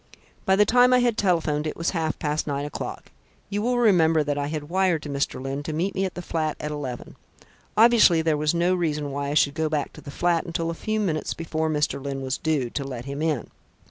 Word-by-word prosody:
"By 190 - +5
the 210 +1 +5
time 245 +3 +5
I - - +6
had 240 -2 +2
telephoned 160 -7 +1
it - - -5
was 165 - -1
half 160 -3 -1
past 150 +1 -2
nine 140 0 -2
o'clock. 145 - -6 0.4
You 205 +1 -1
will 245 +2 +1
remember 165 -9 +4
that 145 0 -1
I 145 0 -2
had 150 -1 -4
wired 180 -2 +1
to 150 - -6
Mr. 140 -1 -2
Lyne 135 +2 -4
to 155 +2 -5
meet 175 +6 -1
me 195 - 0
at 185 - -5
the 180 - -6
flat 155 -2 -2
at 150 - -4
eleven. 135 -5 -6 0.6
Obviously 215 -8 +6
there 160 -1 +2
was 150 +2 0
no 175 +2 +2
reason 150 -5 -1
why 140 0 -3
I 145 - -2
should 140 -1 +3
go 160 0 -1
back 150 -2 -2
to - - -12
the - - -10
flat 170 +3 +1
until 165 -1 -2
a - - -4
few 215 +6 -2
minutes 165 -7 -1
before 160 -1 -2
Mr. 150 -2 -1
Lyne 135 -1 -4
was 130 0 -2
due, 145 -7 0
to 140 - -3
let 125 -3 -6
him 140 +2 -5
in. 155 -7 -1
155 Hz, 240 wpm, -25 LUFS, 145-180 Hz, 0.6 s, I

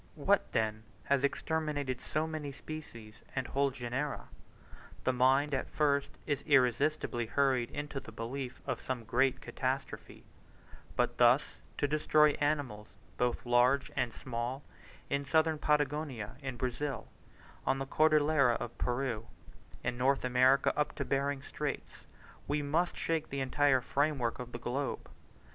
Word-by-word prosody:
What, 190 +7 +2
then, 110 -1 0 0.2
has 140 -1 +1
exterminated 145 -3 -1
so 155 +1 -1
many 155 -3 -4
species 115 -8 -9
and 130 -2 -1
whole 140 +2 +1
genera? 130 +3 -4 0.7
The 130 - +2
mind 135 +4 +3
at 130 - -1
first 140 -2 +1
is 145 -3 -1
irresistibly 130 -2 +2
hurried 130 -1 +2
into 145 -1 -4
the 115 - -11
belief 125 +3 -5
of - - -3
some 125 -3 -3
great 130 +3 +2
catastrophe; 130 +1 -4 0.7
but - - 0
thus - - +4 0.2
to 145 - +1
destroy 150 0 +4
animals, 145 -8 0 0.3
both 125 0 0
large 120 +3 +3
and 120 - 0
small, 125 +3 -4 0.4
in 140 0 0
Southern 160 +2 +2
Patagonia, 145 -7 0
in 130 -3 -5
Brazil, 130 +3 -3 0.6
on 135 - +3
the 135 - -3
Cordillera 150 -3 +4
of 120 0 -5
Peru, 120 -3 -1 0.6
in 120 - -2
North 135 +1 +2
America 130 +2 +4
up 150 - 0
to - - -3
Behring's 140 0 -1
Straits, - - -5 0.4
we 145 +1 0
must 165 +5 0
shake 160 -1 -1
the 140 - -3
entire 135 0 +3
framework 140 -4 0
of 125 -1 -6
the - - -5
globe. 125 +4 -3
135 Hz, 140 wpm, -32 LUFS, 125-145 Hz, 0.7 s, thus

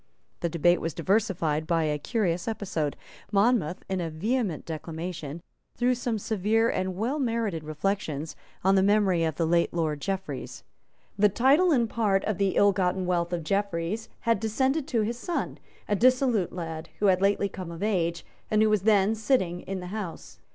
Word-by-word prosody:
The 170 - -1
debate 170 +1 +3
was 165 -1 -3
diversified 165 -5 0
by 165 -1 +2
a 150 -1 0
curious 180 - -1
episode. 180 -9 -2 0.3
Monmouth, 200 -5 +2
in 190 -1 -1
a 165 - -2
vehement 200 - -1
declamation, 165 0 -6 0.3
threw 245 +1 +3
some 240 -2 -2
severe 220 +2 +1
and 185 0 -2
well 240 +10 -1
merited 225 - -1
reflections 155 -1 -3 0.3
on 190 +1 +4
the 190 - +4
memory 195 -4 +3
of 160 -2 0
the 165 - 0
late 170 +1 +2
Lord 155 -3 -1
Jeffreys. 190 -8 -4 0.6
The 210 0 +6
title 275 - +4
and 240 -6 +3
part 210 -4 +1
of 215 -3 -2
the 195 -2 +1
ill 200 0 +5
gotten 185 0 0
wealth 175 -1 0
of 175 -2 -2
Jeffreys 200 +3 -1
had 230 -3 +2
descended 265 +7 0
to 235 -7 +1
his 235 +3 -2
son, 345 +4 -3 0.3
a 205 - +1
dissolute 250 -4 +3
lad, 165 -2 -6
who 210 - 0
had 185 -2 +4
lately 200 0 +2
come 185 -3 -7
of 170 +3 -6
age, 170 -5 0 0.2
and 215 0 +3
who 215 - +3
was 210 -3 +3
then 205 0 +4
sitting 210 -6 0
in 195 -1 -5
the 180 - -7
House. 205 -6 -6
195 Hz, 180 wpm, -27 LUFS, 170-220 Hz, 0.6 s, The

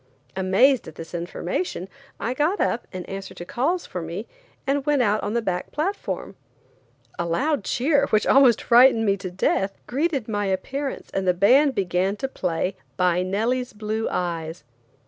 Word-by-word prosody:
Amazed 195 +8 +3
at 160 - -10
this 165 +1 -9
information 180 +1 -3 0.3
I 230 +5 -1
got 305 +9 +1
up, 235 - 0
in 185 -2 -6
answer 195 0 -7
to 175 - -8
calls 320 - -1
for 180 - -5
me, 170 +6 -5 0.4
and 280 0 +1
went 290 -3 +2
out 210 -1 +2
on 210 +3 -3
the 235 - +1
back 180 -3 -2
platform. 380 +7 -3 0.8
A 170 - 0
loud 280 - 0
cheer, 280 +6 +2
which 215 - +2
almost 260 -4 +5
frightened 240 -1 +6
me 200 -1 +3
to 190 -1 -6
death, 195 +2 0
greeted 275 -2 -1
my 205 -2 -1
appearance 265 +9 -3
and 190 -1 -1
the 180 - +3
band 260 +9 +5
began 190 0 0
to 270 - -3
play 180 -5 -2 0.2
"By 180 -1 +2
Nellie's 230 +7 -1
Blue 215 +1 -2
Eyes." 165 -2 -3
210 Hz, 165 wpm, -24 LUFS, 185-265 Hz, 0.8 s, frightened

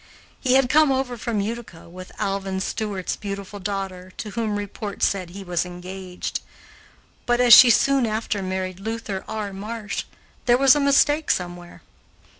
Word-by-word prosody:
He 255 -2 +1
had 265 -1 +4
come 300 +2 +4
over 260 -2 -1
from 230 -2 -2
Utica 215 -6 -6
with 185 +2 -11
Alvin 195 -1 -2
Stewart's 195 -1 -3
beautiful 200 0 -6
daughter, 190 -2 -5
to 210 - -6
whom 220 -1 -2
report 205 0 -5
said 185 -3 +1
he 195 +3 -9
was 175 -2 -1
engaged; 180 +1 -6 0.9
but, 240 0 +2
as 245 -1 +7
she 250 - +11
soon 270 +1 +3
after 215 -1 -2
married 185 -1 -3
Luther 220 -2 -4
R. 210 -2 -4
Marsh, 210 +1 -5 0.4
there 240 0 +6
was 270 0 +6
a - - +1
mistake 290 +2 +3
somewhere. 175 -1 -3
205 Hz, 155 wpm, -23 LUFS, 190-235 Hz, 0.9 s, she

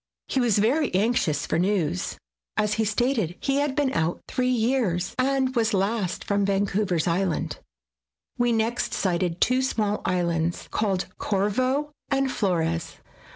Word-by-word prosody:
He 270 - 0
was 235 -5 +3
very 260 +9 +2
anxious 190 -8 +1
for 160 - 0
news, 180 -3 0 0.4
as 210 -1 +2
he 220 +1 +1
stated 215 - 0
he 275 0 0
had 285 -1 0
been 285 -3 +1
out 165 +1 0
three 255 -1 0
years, 225 -7 +1
and 265 0 +1
was 225 -3 +2
last 195 -1 -1
from 200 0 +1
Vancouver 195 -1 +1
's 160 - 0
Island. 175 0 -1 0.8
We 240 0 +2
next 225 +1 0
sighted 175 -2 0
two 255 +1 +3
small 215 -5 0
islands, 170 -2 0
called 195 -4 0
Corvo 255 +9 0 0.2
and 270 -1 +1
Flores. 165 -6 -1
210 Hz, 145 wpm, -25 LUFS, 180-255 Hz, 0.8 s, was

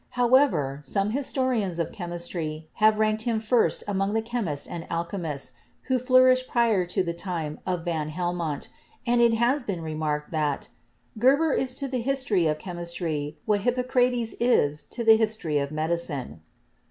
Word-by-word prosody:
How 245 0 +2
ever, 145 - +3
some 195 +8 0
historians 255 -8 0
of 170 - -2
chemistry 170 -3 -5
have 215 0 +5
ranked 215 0 +1
him 230 -1 0
first 225 +2 +1
among 195 0 0
the 225 - +2
chemists 220 -12 -3
and 165 -1 -7
alchemists 170 -4 -3 0.3
who 260 -1 +1
flourished 255 0 +4
prior 225 -7 +2
to 185 +2 0
the 170 -1 -2
time 170 -4 -4
of 180 -2 -2
van 160 -3 -2
Helmont, 170 -2 -3 0.4
and 240 0 +3
it 235 -1 +5
has 245 +5 +2
been 195 -8 -4
remarked 155 -1 -3
that 150 -3 -1 0.5
"Geber 280 +6 +4
is 255 -1 -1
to 275 +1 -3
the 255 -2 -2
history 240 -9 +1
of 155 0 0
chemistry 170 -3 -4
what 210 -2 +1
Hippocrates 245 0 +1
is 150 -12 +2
to 235 - -5
the 225 -1 +7
history 215 -9 0
of 140 0 -2
medicine." 155 - -3
195 Hz, 160 wpm, -26 LUFS, 160-240 Hz, 0.5 s, the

